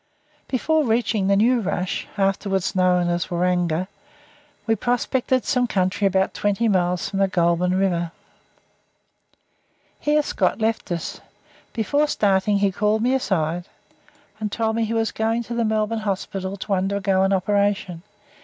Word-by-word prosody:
Before 310 +4 +1
reaching 220 -4 +1
the 200 - +4
new 240 +5 +3
rush, 185 -2 -2
afterwards 195 -1 0
known 180 -1 +3
as 175 0 -1
Waranga, 175 -1 0 0.8
we 225 - +2
prospected 245 +3 0
some 250 -3 +1
country 190 -1 +1
about 190 0 +1
twenty 205 +3 0
miles 180 -3 +1
from 195 - -3
the 195 - +4
Goulburn 175 0 +1
river. 175 -3 0 1.9
Here 300 0 +2
Scott - - 0
left 220 -3 -1
us. 170 -1 -4 0.5
Before 285 +7 +1
starting 200 -5 +2
he 200 -1 +2
called 210 +3 +1
me 250 +2 +2
aside, 175 -9 -1 0.7
and 210 -1 -3
told 220 0 -1
me 230 0 +1
he 225 - -3
was 225 -1 0
going 225 +2 -1
to 235 - -6
the 235 0 0
Melbourne 220 0 0
Hospital 195 -1 -3
to 200 +1 -3
undergo 195 0 +1
an 195 0 +2
operation. 195 -2 0
200 Hz, 145 wpm, -22 LUFS, 185-225 Hz, 1.9 s, the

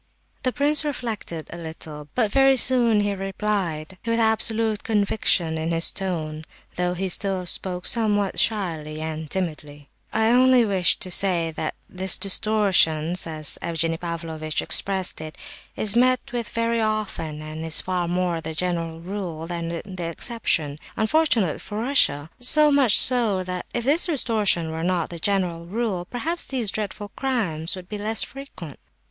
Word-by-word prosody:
The 255 - 0
prince 295 +3 +4
reflected 225 - -5
a - - -7
little, 160 -2 -8
but 225 -5 +1
very 270 +1 +4
soon 235 -3 +3
he 205 0 0
replied, 190 -4 -3
with 230 0 0
absolute 220 -1 +2
conviction 200 -6 +1
in 160 +1 -2
his 165 0 +4
tone, 160 -5 -4 0.3
though 180 0 -1
he 190 +2 -2
still 190 0 0
spoke 180 0 -1
somewhat 205 -4 +2
shyly 160 -8 -1
and 155 -1 -5
timidly: 150 -5 -5 0.2
"I 220 0 +2
only 255 -1 +5
wished 190 -4 +2
to 185 - -4
say 175 -3 +3
that 155 0 -4
this 185 +1 +2
'distortion,' 190 -6 +2 0.2
as 155 -2 +3
Evgenie 165 0 -1
Pavlovitch 165 -2 -3
expressed 190 -4 +2
it, 155 0 -9 0.4
is 210 0 +2
met 255 +1 +2
with 240 -2 -4
very 230 0 -1
often, 200 -8 -3
and 155 +1 -7
is 160 -1 0
far 180 -2 -2
more 175 -1 -1
the 160 0 -6
general 165 -1 -3
rule 175 -3 -5
than 170 -1 -5
the 185 -3 -6
exception, 165 -5 -1 0.2
unfortunately 220 - +2
for 210 - -7
Russia. 195 - +1
So 300 +4 +6
much 270 -6 +4
so, 230 -7 +3
that 180 0 -5
if 240 - -3
this 295 +9 +3
distortion 215 - +1
were 160 +1 -4
not 175 -1 -1
the 170 - -7
general 175 -3 -1
rule, 200 -3 -2
perhaps 320 - -4
these 240 -7 0
dreadful 205 -1 -4
crimes 195 - -1
would 185 -1 -10
be 210 +1 -6
less 220 +2 0
frequent." 265 - -10
190 Hz, 155 wpm, -23 LUFS, 165-225 Hz, 0.4 s, So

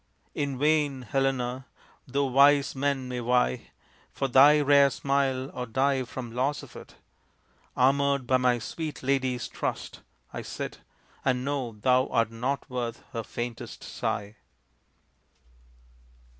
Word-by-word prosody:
In 140 -2 -2
vain, 145 -2 +1
Helena! 130 0 -1 0.4
though 140 +2 0
wise 140 +2 +4
men 135 -1 -1
may 125 -1 -4
vie 120 - +1 0.4
For 135 - -2
thy 140 +4 +7
rare 140 -1 +5
smile 135 -1 -1
or 125 0 -5
die 130 +2 +1
from 120 -1 -7
loss 130 +4 -1
of - - -13
it, - - -12 0.8
Armored 140 +1 +3
by 130 +1 +3
my 125 -1 +2
sweet 155 +6 -6
lady's 130 -3 0
trust, - - -5 0.3
I - - -4
sit, - - -6 0.4
And 130 -1 0
know 135 -5 -2
thou 125 +5 +2
art 115 -1 +1
not 130 +5 -3
worth 120 -3 -4
her 115 - -2
faintest 120 +1 -6
sigh. 100 +1 -4
130 Hz, 130 wpm, -27 LUFS, 125-140 Hz, 0.8 s, thy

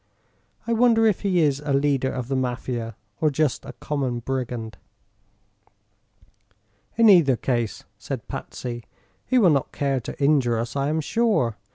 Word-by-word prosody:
I 235 - 0
wonder 230 -1 +4
if 215 -4 +3
he 185 -4 +2
is 145 -3 +2
a 145 -1 -1
leader 135 -1 +1
of 125 -2 -4
the 135 - -1
Mafia, 125 -2 -3 0.2
or 155 - +3
just 150 -2 0
a - - -8
common 135 -5 -3
brigand?" 120 -4 -4 2.2
"In 230 -1 +6
either 170 -10 +6
case," 120 -2 -2 0.2
said - - -6
Patsy, 120 -2 -6 0.4
"he 255 - +2
will 195 -8 +6
not 140 -3 0
care 140 -2 -1
to 115 - -8
injure 140 -5 +3
us, 115 +3 -4
I 140 0 0
am 160 +1 0
sure. 200 - +1
135 Hz, 155 wpm, -24 LUFS, 125-160 Hz, 2.2 s, In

